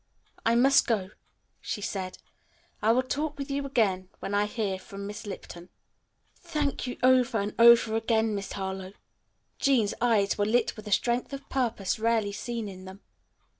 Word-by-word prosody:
"I 230 - +3
must 270 +3 +5
go," 205 -4 0 0.5
she - - -4
said. 190 -2 -4 0.6
"I 220 - +4
will 255 +3 +3
talk 290 +4 -3
with 275 0 -5
you 280 0 -2
again 195 -8 +1
when 200 - -5
I 205 +1 +2
hear 205 -4 -2
from 200 +1 -9
Miss 205 +1 -7
Lipton." 180 -2 -8 0.7
"Thank 290 -4 -2
you 245 - -5
over 255 -2 +4
and 205 0 -2
over 235 -1 +7
again, 225 -1 +1
Miss 200 -1 -4
Harlowe." 190 -1 -5 0.7
Jean's 245 -7 +2
eyes 215 -5 +2
were 205 - +3
lit 235 +1 +1
with 215 -1 -10
a - - -6
strength 240 +6 +1
of 275 0 -7
purpose 230 -7 -1
rarely 225 -2 +1
seen 230 +2 -4
in 185 -1 -9
them. 190 +2 -11
220 Hz, 170 wpm, -28 LUFS, 200-245 Hz, 0.7 s, over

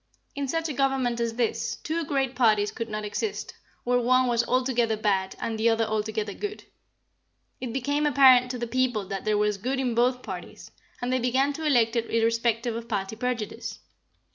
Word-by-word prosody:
In 280 -1 -3
such 325 +4 -1
a 300 - -3
government 265 -3 0
as 230 -1 -1
this, 235 -2 -1
two 335 +1 -3
great 270 -3 -1
parties 215 -4 +3
could 230 -1 -5
not 215 0 -4
exist, 405 - -3 0.3
where 245 0 +2
one 255 +1 +3
was 240 -1 +2
altogether 245 -3 +1
bad 195 -3 0
and 225 -1 -3
the 230 +1 +4
other 225 0 +2
altogether 215 -1 -2
good. 420 0 -5 1.0
It 250 -2 -4
became 285 +4 0
apparent 255 -3 +6
to 250 - -3
the 240 - -3
people 245 -3 0
that 195 -1 -4
there 215 -1 +2
was 210 -1 +1
good 260 +6 -2
in 250 -3 0
both 250 +2 +1
parties, - - -8 0.3
and 250 +1 0
they 255 - +2
began 260 +4 +1
to 315 +2 -5
elect 240 -5 +3
it 230 -1 -1
irrespective 230 0 +1
of 230 0 -6
party 200 -1 -2
prejudice. 235 -2 -4
240 Hz, 190 wpm, -26 LUFS, 225-260 Hz, 1.0 s, apparent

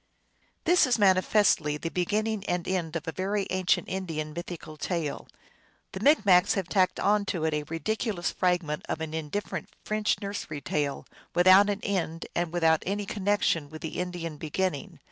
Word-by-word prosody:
This 350 -3 +4
is 245 - +2
manifestly 185 -6 +3
the 165 - -4
beginning 210 +3 -1
and 175 -1 -2
end 175 -4 -2
of 165 0 -4
a - - -1
very 195 +3 -1
ancient 185 -1 +1
Indian 160 -5 -4
mythical 170 -2 -7
tale. 160 -1 -3 0.6
The - - -6
Micmacs 205 - +5
have 190 -3 -2
tacked 185 -1 +2
on 210 0 +3
to 170 -5 -2
it 160 - 0
a 150 - 0
ridiculous 200 +2 -2
fragment 175 -5 0
of - - -2
an 160 -1 -5
indifferent 160 +4 -4 0.2
French 215 0 0
nursery 200 -7 -5
tale, 145 0 -2 0.3
without 185 +3 +7
an 205 -1 -2
end 170 -4 -2
and 175 -1 -1
witnout 165 -2 +3
any 205 +1 -1
connection 195 -7 0
with 155 +1 -10
the 160 - -4
Indian 175 -3 -4
beginning. 155 0 -3
180 Hz, 165 wpm, -28 LUFS, 160-200 Hz, 0.6 s, without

